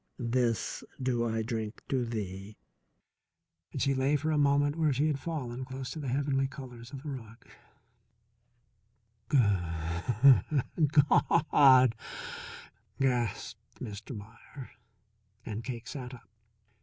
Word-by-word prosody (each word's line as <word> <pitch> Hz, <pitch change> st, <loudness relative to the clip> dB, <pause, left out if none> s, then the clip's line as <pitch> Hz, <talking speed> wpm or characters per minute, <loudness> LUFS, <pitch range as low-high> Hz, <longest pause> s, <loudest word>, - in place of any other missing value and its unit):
This 120 Hz, -2 st, 0 dB, 0.2 s
do 120 Hz, -3 st, 0 dB
I 110 Hz, 0 st, -1 dB
drink 110 Hz, -1 st, -4 dB
to 130 Hz, -2 st, +1 dB
thee." 105 Hz, -2 st, -5 dB, 1.2 s
She 140 Hz, -, +2 dB
lay 135 Hz, +2 st, +2 dB
for 155 Hz, +2 st, 0 dB
a 155 Hz, -, +1 dB
moment 145 Hz, 0 st, +3 dB
where 160 Hz, -2 st, +2 dB
she 140 Hz, +3 st, +1 dB
had 150 Hz, -3 st, 0 dB
fallen 130 Hz, -6 st, -4 dB
close 130 Hz, 0 st, -6 dB
to 160 Hz, -, -6 dB
the 145 Hz, -, -5 dB
heavenly 135 Hz, +1 st, +1 dB
colours 125 Hz, -3 st, -10 dB
of 135 Hz, -1 st, -8 dB
the 150 Hz, -, -5 dB
rug. 120 Hz, -2 st, -9 dB, 1.8 s
"Goo 150 Hz, -, +4 dB
hood 105 Hz, -, +2 dB
Gaw 150 Hz, +2 st, +4 dB
hud!" 130 Hz, -4 st, +7 dB, 1.1 s
gasped 125 Hz, -4 st, -2 dB
Mr. 105 Hz, +3 st, -7 dB
Meier, 115 Hz, +6 st, -11 dB, 0.7 s
and 110 Hz, +1 st, -5 dB
Cake 120 Hz, -2 st, -6 dB
sat 125 Hz, -1 st, -6 dB
up. 115 Hz, -, -17 dB
130 Hz, 120 wpm, -30 LUFS, 115-140 Hz, 1.8 s, hud